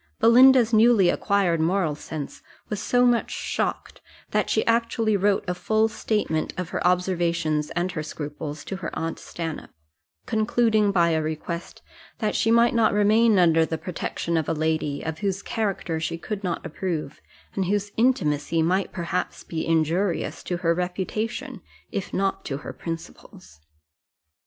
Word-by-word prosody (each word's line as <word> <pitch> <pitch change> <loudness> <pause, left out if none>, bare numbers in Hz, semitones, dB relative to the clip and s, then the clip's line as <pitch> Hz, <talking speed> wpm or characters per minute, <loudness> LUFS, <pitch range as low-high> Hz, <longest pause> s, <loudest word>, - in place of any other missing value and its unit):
Belinda's 245 0 +6
newly 220 -4 +5
acquired 195 -5 +1
moral 170 -1 +1
sense 150 0 -7 0.3
was 210 -1 -3
so 245 +2 +3
much 240 -1 +2
shocked, - - -3 0.3
that - - +1
she - - +1
actually 230 -1 +1
wrote 200 +1 +1
a 180 - 0
full 220 +4 +1
statement 210 -8 -1
of 180 -2 -3
her - - -3
observations 170 -4 0
and 175 +1 0
her 160 - -4
scruples 150 -1 -6
to 195 - -4
her 180 -3 -4
aunt 165 0 -3
Stanhope; 165 -2 -6 0.6
concluding 220 -1 +2
by 170 -3 +3
a 160 -1 +1
request, 160 +2 -5 0.3
that 215 - -1
she 225 - +2
might 235 +1 +5
not 230 -3 +3
remain 215 +1 +4
under 165 -2 +5
the 160 0 -2
protection 170 0 -3
of 160 - -1
a - - +2
lady, 155 -2 -1
of 160 0 -4
whose 195 0 -2
character 195 -7 -2
she 165 +1 -3
could 200 +4 -5
not 175 -3 -3
approve, 160 -3 -4 0.3
and 195 - -1
whose 205 +2 -1
intimacy 165 - +1
might 185 +4 +1
perhaps 175 +1 -3
be 160 -2 -4
injurious 165 +3 0
to 175 - -3
her 170 -1 +1
reputation, 210 - -3 0.3
if 195 - -4
not 195 0 -1
to 135 - -4
her - - -5
principles. 165 - -9
180 Hz, 155 wpm, -24 LUFS, 160-215 Hz, 0.6 s, Belinda's